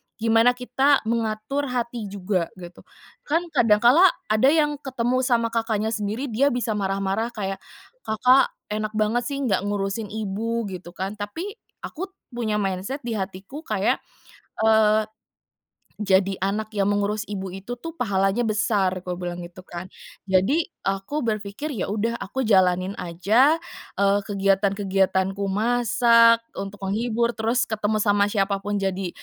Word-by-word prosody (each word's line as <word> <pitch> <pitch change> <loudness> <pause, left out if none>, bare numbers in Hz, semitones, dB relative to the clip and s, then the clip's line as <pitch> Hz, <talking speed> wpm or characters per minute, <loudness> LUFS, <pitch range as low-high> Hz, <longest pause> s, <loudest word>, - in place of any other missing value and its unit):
gimana 225 +2 +3
kita 270 +3 +2
mengatur 225 +4 -1
hati 235 -3 -3
juga, 190 -3 -1
gitu. 180 -1 -11 0.5
Kan, 330 +4 +1
kadang 220 -4 +3
kala 320 +11 +7 0.2
ada 215 +5 +4
yang 295 -1 +2
ketemu 255 -2 -1
sama 235 -3 +1
kakaknya 220 -1 -1
sendiri 225 +4 -3
dia 270 +6 +3
bisa 245 -4 -1
marah-marah 195 +1 -1
kayak, 195 -2 -3 0.5
"Kakak 250 +5 +4 0.2
enak 215 0 -3
banget 220 +3 +1
sih, 280 -1 -3
nggak 200 -7 +2
ngurusin 205 +1 -2
ibu", 220 +3 -3
gitu 175 -1 -9
kan. 195 +3 -4
Tapi, 350 - -6 0.2
aku 375 +5 -5 0.2
punya 230 -3 -2
mindset 200 +7 -2
di 235 - -4
hatiku 195 +6 -5
kayak, 210 -1 +1 0.7
eee, 215 -1 +4 0.9
"Jadi 195 -1 +2
anak 210 +3 -1
yang 195 0 +2
mengurus 205 +1 -1
ibu 195 -2 -4
itu 195 +6 -6
tuh, 245 +7 -7
pahalanya 195 +4 +1
besar," 205 -4 +1
aku 180 -1 -5
bilang 175 -1 -5
itu 175 +1 -10
kan. 175 +1 -8 0.4
Jadi, 190 - +3 0.2
aku 195 +10 -1
berpikir, 215 +7 -3
"Ya 200 - -3
udah, 215 +3 -1
aku 260 +5 -3
jalanin 185 -2 +3
aja, 215 - +3 0.4
eee, 200 0 +3
kegiatan-kegiatanku, 195 -1 +1
masak 230 +1 +4
untuk 195 0 -6
menghibur, 235 +3 0
terus 235 +4 0
ketemu 215 -1 -1
sama 205 -1 +2
siapapun, 200 0 -1
jadi, 195 -2 -2
215 Hz, 140 wpm, -24 LUFS, 195-235 Hz, 0.9 s, kala